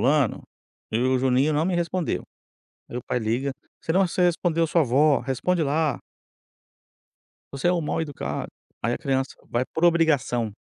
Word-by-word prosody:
fulano, 140 -2 +2 0.5
e 110 - 0
o 130 +1 +2
Juninho 130 +3 +2
não 150 +2 +1
me 185 0 0
respondeu". 175 0 -1 0.7
Aí 120 - -5
o 125 - -6
pai 125 - -1
liga: 120 +5 -1 0.3
"Você 160 - -1
não 190 +1 +3
você 180 +1 0
respondeu 170 -1 +2
sua 165 +1 +3
avó, 140 +1 +3
responde 160 +6 0
lá". 150 +1 0 1.5
Você 140 +4 -2
é - - +4
um 175 - +1
mal-educado. 150 -2 -3 0.3
Aí 120 +2 +1
a - - -2
criança 135 -1 -1
vai 120 +2 0
por 160 - 0
obrigação. 145 -9 +2
145 Hz, 165 wpm, -25 LUFS, 130-165 Hz, 1.5 s, é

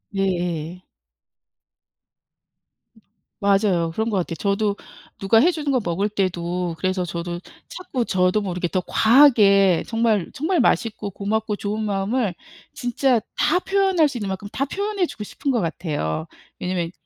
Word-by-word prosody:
예예. 180 -3 -2 2.6
맞아요. 195 -4 +2
그런 220 +6 -2
것 205 - 0
같아요. 170 -2 -2
저도 200 +2 0 0.4
누가 200 +3 +3
해 335 - +5
주는 300 -4 -2
거 260 - +2
먹을 185 +4 -1
때도 180 -3 -2
그래서 185 0 -1
저도 175 +1 -4 0.3
자꾸 280 -10 -4
저도 185 +2 +2
모르게 180 -3 -2
더 185 +1 -1
과하게 210 - +5
정말 225 -5 +1
정말 335 +5 0
맛있고 225 -4 +1
고맙고 210 +2 -2
좋은 210 +1 -3
마음을 205 0 -1 0.4
진짜 245 0 +1 0.2
다 315 - +2
표현할 385 -4 +2
수 250 - -5
있는 205 -2 -3
만큼 190 +2 -5
다 275 - -1
표현해 400 +3 -1
주고 210 - -7
싶은 275 - -5
것 250 -3 +2
같아요. 150 - -3 0.3
왜냐면 180 -2 -2
200 Hz, 280 characters per minute, -22 LUFS, 180-240 Hz, 2.6 s, 해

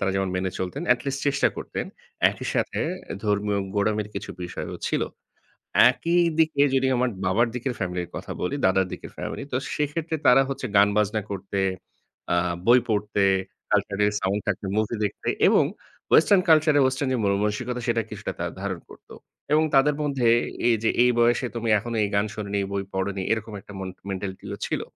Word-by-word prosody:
তারা 95 - +1
যেমন 95 -1 0
মেনে 95 +1 -1
চলতেন, 95 - -3
এট 125 - -3
লিস্ট 140 0 -2
চেষ্টা 140 0 +3
করতেন। - - -4 0.4
একই - - -7
সাথে - - -1 0.3
এ - - -4
ধর্মীয় 105 0 +1 0.2
গোঁড়ামির 105 0 0
কিছু 100 - -5
বিষয়ও 90 - -5
ছিল। - - 0 0.9
একই 170 +1 0 0.2
দিকে 155 -3 +3
যদি 130 0 +2
আমার 125 0 +1 0.2
বাবার 110 +6 +3
দিকের 125 +1 -2
ফ্যামিলির 90 -2 -3
কথা - - -6
বলি, 90 - -1
দাদার 95 0 +3
দিকের - - -8
ফ্যামিলি। - - -5
তো 130 - +1 0.2
সেক্ষেত্রে 155 +2 -2
তারা 135 +2 +7
হচ্ছে 135 - -4
গান 100 +1 +7
বাজনা 105 +1 +1
করতে, 100 0 -3 0.7
আ - - +3 0.3
বই 120 +2 +7
পড়তে, 105 -2 0 0.5
কালচার 100 -1 +1
এর 105 - +2
সাউন্ড 100 +2 0
থাকতে, 100 0 -1
মুভি 110 +2 0
দেখতে, 100 - -5 0.2
এবং - - +5 0.5
ওয়েসটার্ন 185 +3 +6
কালচারের 155 -2 +5
ওয়েসটার্ন 130 +1 0
যে - - +1
মনমানসিকতা, 105 +5 0
সেটা 115 -1 +2
কিছুটা 105 -1 -5
তারা 85 0 -2
ধারণ 95 -3 -3
করত, - - -16 0.4
এবং 155 +1 +5
তাদের 140 +2 +4
মধ্যে, 135 -5 0 0.4
এই 120 - +5
যে, 110 - +3
"এই 125 - +5
বয়সে, 120 +2 +3
তুমি 115 -1 -2
এখনো 115 +3 -4
এই 100 - 0
গান 100 - +2
শোননি, 100 -1 -3
এই 100 - -3
বই 100 0 -1
পড়োনি।" 95 0 -2
এরকম 110 -1 -1
একটা 100 - -13
মন 95 -1 -4 0.2
মেন্টালিটি 95 0 -5
ও - - -6
ছিল। - - -2
105 Hz, 185 wpm, -25 LUFS, 100-130 Hz, 0.9 s, তারা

